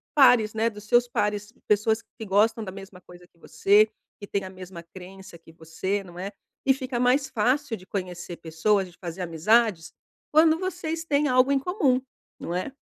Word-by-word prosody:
pares, 245 -7 +5
né, 225 +1 +2
dos 210 -1 -12
seus 240 +3 +3
pares. 210 -1 -2
Pessoas 215 +2 +2
que 220 - -11
gostam 215 +3 +2
da 190 - -6
mesma 195 -1 -11
coisa 180 0 -16
que 170 - -33
você, 210 +5 +3 0.3
que 205 - -8
têm 195 -1 -2
a 190 - -7
mesma 185 -2 -10
crença 185 +1 -12
que 165 - -18
você, 165 +5 -4
não 175 -2 -13
é? 195 +3 -5 0.3
E 265 - +5
fica 260 -2 -4
mais 255 +3 +2
fácil 255 +1 0
de 185 - -16
conhecer 180 -3 -5
pessoas, 185 +4 0
de 175 - -23
fazer 175 0 -6
amizades, 180 +2 +1 0.4
quando 315 +1 +5
vocês 340 -3 -3
têm 295 -1 +1
algo 255 +1 +3
em 275 - +3
comum, 275 - +1 0.4
não 170 - -4
é? 185 +8 -3
210 Hz, 185 wpm, -25 LUFS, 185-250 Hz, 0.4 s, pares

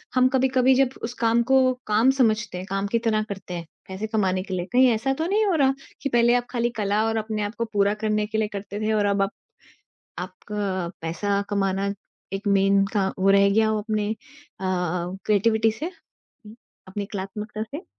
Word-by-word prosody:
हम 255 0 +5
कभी-कभी 260 0 +4
जब 265 0 +2
उस 235 +1 -3
काम 230 0 +3
को 260 +1 +4
काम 220 +5 +4
समझते 215 -6 +1
हैं, 180 - -5
काम 195 +1 -1
की 230 +3 +1
तरह 220 -2 +1
करते 195 -2 -6
हैं, 170 -1 -5 0.2
पैसे 190 +3 -4
कमाने 190 -4 0
के 190 - -6
लिए 175 -1 -2
कहीं 255 +1 +6
ऐसा 230 +4 0
तो 315 +4 -2
नहीं 420 +3 +2
हो 395 - +2
रहा 270 -3 +3 0.3
कि 280 - -1
पहले 240 -1 +4
आप 245 0 +1
खाली 240 -1 0
कला 205 +1 +1
और 225 0 0
अपने 215 -1 -2
आप 205 +2 -4
को 230 - 0
पूरा 200 0 +3
करने 215 0 +1
के 220 +1 -3
लिए 220 - +1
करते 205 +1 -5
थे 220 0 +1
और 210 -1 +2
अब 200 0 +1
आप 195 +2 +1 0.9
आपका 185 0 -4
पैसा 200 +5 -1
कमाना 195 0 0 0.4
एक 195 +2 -4
मेन 195 0 +4
का 200 -3 +1
वो 195 +1 +3
रह 200 0 +5
गया 220 +2 +3
हो 220 0 +1
अपने 210 -1 -1
अ, - - 0 0.5
क्रिएटिविटी 190 +5 +1
से 310 - -3 0.6
उ 210 - -11 0.3
अपनी 200 +1 -4
कलात्मकता 210 +2 -5
से? 290 - -7
210 Hz, 200 wpm, -24 LUFS, 195-230 Hz, 0.9 s, कहीं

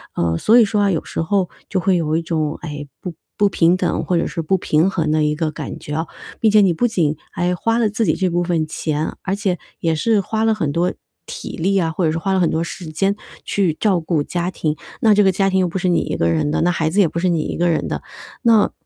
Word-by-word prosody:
呃， 85 -1 0
所 235 +3 +5
以 225 - +6
说 205 0 0
啊 200 - +3
有 165 - -2
时 - - -3
候 185 +2 0 0.2
就 190 - 0
会 185 0 +2
有 160 -2 0
一 - - 0
种， 155 -2 -1
哎， 145 -3 -6
不 180 - -6 0.2
不 205 - +4
平 175 0 +3
等 180 -2 -1
或 180 - +1
者 - - +1
是 165 - -3
不 185 +4 +1
平 160 +2 +2
衡 160 -5 -1
的 155 0 +2
一 150 0 +1
个 155 -1 -1
感 - - -6
觉 150 - -7
哦。 160 +2 -2 0.3
毕 220 - +4
竟 210 -1 +5
你 175 - +3
不 245 +9 +1
仅 160 -9 0 0.2
还 175 0 0
花 230 +5 0
了 225 -3 +2
自 220 +1 0
己 155 - +2
这 190 - 0
部 175 0 0
分 170 -3 0
钱， 155 0 -3
而 195 0 -2
且 195 -4 -1 0.2
也 165 -1 +1
是 215 +7 +2
花 220 +3 -1
了 225 0 +3
很 155 -8 -1
多 175 +3 0 0.3
体 - - -7
力 195 +4 +1
啊， 165 -3 +1
或 170 +1 -1
者 155 - +2
是 165 - -1
花 195 +3 -2
了 190 - +2
很 170 - +3
多 160 - 0
时 170 +1 -7
间 195 +6 0 0.3
去 190 -5 0
照 195 -5 +2
顾 160 -2 0
家 175 +3 -2
庭。 155 -4 -2 0.3
那 220 -2 +5
这 205 0 +4
个 190 - +5
家 195 +1 +2
庭 190 0 +1
又 180 - +2
不 175 - -4
是 180 0 0
你 170 - +3
一 - - -3
个 85 - +1
人 85 - +1
的， - - 0
那 175 +1 +3
孩 160 -2 0
子 200 +5 0
也 185 - +4
不 170 - -3
是 185 - +1
你 170 -3 +1
一 - - -4
个 175 +1 +2
人 165 - 0
的， - - -3 0.4
那， 225 -3 +4
175 Hz, 300 characters per minute, -19 LUFS, 160-195 Hz, 0.4 s, 以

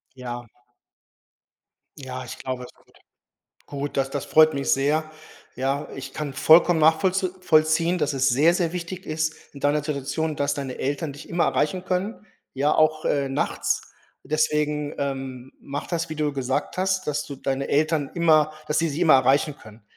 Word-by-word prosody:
Ja. 120 -1 -6 1.5
Ja, 130 -2 -6
ich - - -8
glaube 130 -1 -4
schon. - - -28 0.8
Gut, 145 0 -5
das 135 0 0
das 140 -1 -3
freut 155 -1 +5
mich 140 - -1
sehr. 155 +3 +1 0.5
Ja, 135 +3 -1
ich 135 0 -7
kann 150 -3 -4
vollkommen 165 +3 +5
nachvollz 185 +5 +3
vollziehen, 165 +1 +3
dass 150 -1 0
es 135 -1 +2
sehr, 150 +8 +4
sehr 175 -2 0
wichtig 180 +1 -6
ist 155 0 -1 0.2
in 140 - -11
deiner 145 +1 +2
Situation, 150 +2 -2
dass 145 0 0
deine 135 -3 -5
Eltern 145 +2 -2
dich 145 - -12
immer 170 -1 +1
erreichen 180 +5 0
können, 195 +4 -2 0.3
ja, 145 +3 +2
auch, 155 0 +2
äh, 140 -1 +1
nachts. 135 - -1 0.4
Deswegen, 150 0 0
ähm, 135 -2 -4
mache 140 +1 -6
das, 165 -1 -1
wie - - -3
du 150 -1 0
gesagt 135 +3 -2
hast, 190 0 0
dass 150 0 -1
du 140 - -7
deine 135 +1 -2
Eltern 155 -1 +1
immer 155 -3 +4
dass 150 - 0
sie 165 0 +1
dich 150 +2 -4
immer 160 -5 +6
erreichen 135 +3 +3
können. 110 0 -15
150 Hz, 170 wpm, -24 LUFS, 135-160 Hz, 1.5 s, immer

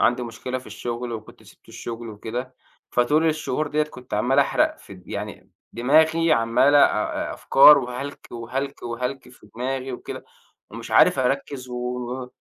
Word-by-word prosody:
عندي 125 +1 +2
مشكلة 125 +2 -5
في 130 - -15
الشغل 120 0 -5
وكنت 110 -1 -9
سِبت - - -20
الشغل 115 0 -7
وكده، 120 +4 -6 0.4
فطول 150 +7 +2
الشهور 155 -2 -1
ديّة 150 +1 +1
كنت 130 -4 -7
عَمّال 125 +6 +2
احرق 310 - +2
في 100 - -13
د 90 -1 -17
يعني - - -7 0.2
دماغي 160 +6 +3
عمَّالة، 130 +3 +4
آآ، 105 -6 +2
أفكار 145 +2 +7
وهلك 130 +2 -6
وهلك 130 +4 -5
وهلك 125 +3 -4
في 125 - -18
دماغي 130 +2 -3
وكده، 125 - -7 0.5
ومش - - -9
عارف - - +5
أركز 130 0 -1
و 125 - -6 0.5
و 125 - -15
125 Hz, 155 wpm, -23 LUFS, 120-140 Hz, 0.5 s, أفكار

